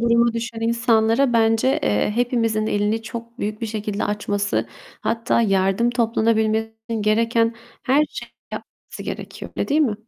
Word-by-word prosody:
duruma 235 0 +3
düşen 230 0 -4
insanlara 230 +2 +2
bence, 225 +3 +3
eee, 105 - +1
hepimizin 230 -3 +1
elini 210 +2 0
çok 235 +1 -8
büyük 210 -1 -3
bir 230 - -2
şekilde 215 -1 -3
açması, 205 -1 -1 0.3
hatta 230 +1 +1
yardım 195 +2 +2
toplanabilmesi 225 -2 +1 0.2
için 225 -2 -2
gereken 230 +2 +2 0.3
her 275 +3 +3
şeyin - - -8 0.2
yapması - - -9
gerekiyor, - - -7
öyle - - -1
değil 295 +3 +3
mi? 250 -9 +2
225 Hz, 145 wpm, -22 LUFS, 215-235 Hz, 0.3 s, duruma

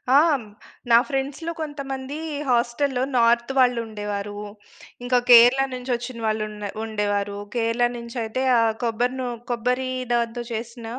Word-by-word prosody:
ఆ! - - +9 0.7
నా 230 - +9
ఫ్రెండ్స్‌లో 280 +4 -3
కొంతమంది 275 -2 -5 0.3
హాస్టల్‌‌లో 245 +2 +1
నార్త్ 235 +1 +3
వాళ్ళు 250 -2 +4
ఉండేవారు. 205 -1 -5 0.7
ఇంకా 250 0 +2
కేరళ 245 +2 +8
నుంచోచ్చిన 245 -1 -4
వాళ్ళు 215 0 0
ఉన్న 210 -1 -6
ఉండేవారు. 205 -2 -1 0.2
కేరళ 235 +1 +2
నుంచైయితే 235 0 -4 0.2
ఆ - - +4 0.2
కొబ్బరి 240 +2 0
నూ 255 - -2 0.2
కొబ్బరి 250 +2 0 0.2
దాంతో 235 0 -1
చేసిన 230 +1 -6
240 Hz, 120 wpm, -23 LUFS, 225-255 Hz, 0.7 s, ఆ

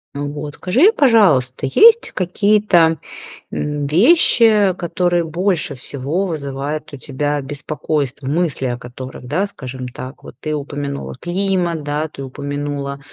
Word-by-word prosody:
Вот, 145 +1 -5
скажи, 265 - +4
пожалуйста, 155 - +3
есть 460 - +5
какие-то, 185 -3 +3 0.5
м, 150 -1 -2
вещи, 215 - +5
которые 175 0 0
больше 175 +1 -1
всего 140 +8 -3
вызывает 145 -2 -4
у - - -6
тебя 145 +2 -2
беспокойство, 145 0 -3
мысли 150 -1 0
о 120 -1 -2
которых, 125 +2 -9
да, 180 +9 0
скажем 130 -8 -7
так, 130 +2 -9
вот - - -11
ты 155 -1 -3
упомянула 140 -1 -5
климат, 175 -3 -1
да, 150 +2 -2
ты 140 -2 -9
упомянула 140 +1 -4
150 Hz, 125 wpm, -18 LUFS, 140-180 Hz, 0.5 s, есть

